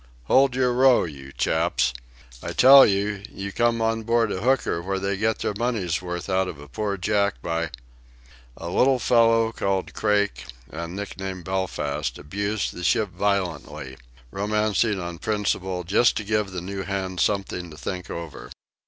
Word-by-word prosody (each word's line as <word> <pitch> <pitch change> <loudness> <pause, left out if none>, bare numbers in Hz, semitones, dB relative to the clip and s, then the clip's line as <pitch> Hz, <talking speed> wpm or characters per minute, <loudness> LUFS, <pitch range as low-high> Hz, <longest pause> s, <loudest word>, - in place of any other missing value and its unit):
Hold 130 - +4
your 125 -1 +2
row, 130 0 +5
you 70 -5 -8
chaps!... 80 -4 +1 0.5
I - - -5
tell 135 +1 +9
you, 100 0 0
you 100 +1 -6
came 115 +1 +1
on 115 0 0
board 115 -1 +1
a 95 - -3
hooker, 125 -8 +1
where 95 +2 -2
they 100 +1 -1
get 110 +2 0
their - - -2
money's 105 -8 -1
worth 90 -1 -5
out 95 -1 +1
of 85 - -6
poor 105 -2 -2
Jack, 100 +2 0
by 85 0 -1 0.5
!..." - - -25
A 85 - -7
little 130 +8 +3
fellow, 115 -1 +3
called 95 -4 -2
Craik 105 -1 0 0.3
and 85 +2 -6
nicknamed 95 -2 -6
Belfast, 75 -6 -2
abused 100 +6 -3
the 90 - -8
ship 110 +3 +2
violently, 80 -9 -2 0.4
romancing 105 +1 0
on 85 -1 -6
principle, 95 -4 -1
just 105 +7 +3
to 110 - -2
give 105 0 0
the 90 -2 -5
new 95 +2 -5
hands 95 -2 -3
something 95 -3 -1
to 75 - -12
think 90 +2 -5
over. 85 -4 -7
100 Hz, 160 wpm, -24 LUFS, 85-110 Hz, 0.5 s, tell